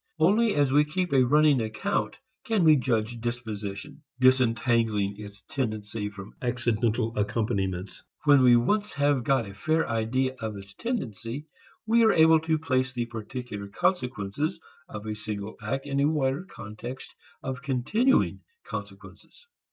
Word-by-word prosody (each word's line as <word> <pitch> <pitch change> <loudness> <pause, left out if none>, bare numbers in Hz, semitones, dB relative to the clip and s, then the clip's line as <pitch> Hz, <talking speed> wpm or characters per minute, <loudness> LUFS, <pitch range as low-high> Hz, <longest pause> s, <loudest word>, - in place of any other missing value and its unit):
Only 210 +7 +3
as 145 -2 +2
we 145 +2 +5
keep 175 +2 -2
a 130 -2 +5
running 145 0 +4
account, 110 - -2 0.3
can 220 -6 +1
we 155 -2 +7
judge 115 -3 -1
disposition, 115 +3 -5 0.2
disentangling 115 -5 +3
its 105 0 -10
tendency 110 -4 -3
from 100 -1 -11
accidental 120 -2 0
accompaniments. 100 -3 -2 0.2
When 125 -5 +6
once 210 +1 0
we 140 - 0
have 145 -3 +3
got 130 -4 +1
a 100 - -9
fair 155 +11 0
idea 115 +3 0
of 110 -2 -4
its 100 0 -11
tendency, 130 - -4 0.4
we 230 +1 +4
are 220 - +5
able 160 0 +6
to 160 0 0
place 130 -4 0
the 120 -2 -2
particular 115 -2 -6
consequences 145 - -1 0.3
of 110 0 -7
a 110 - -3
single 105 -1 -5
act 135 +6 -3
in 140 -1 -1
a 140 - +4
wider 145 +1 0
context 120 - -9 0.3
of 130 -1 -4
continuing 140 - +1 0.2
consequences. 480 - -9
125 Hz, 145 wpm, -27 LUFS, 110-150 Hz, 0.4 s, we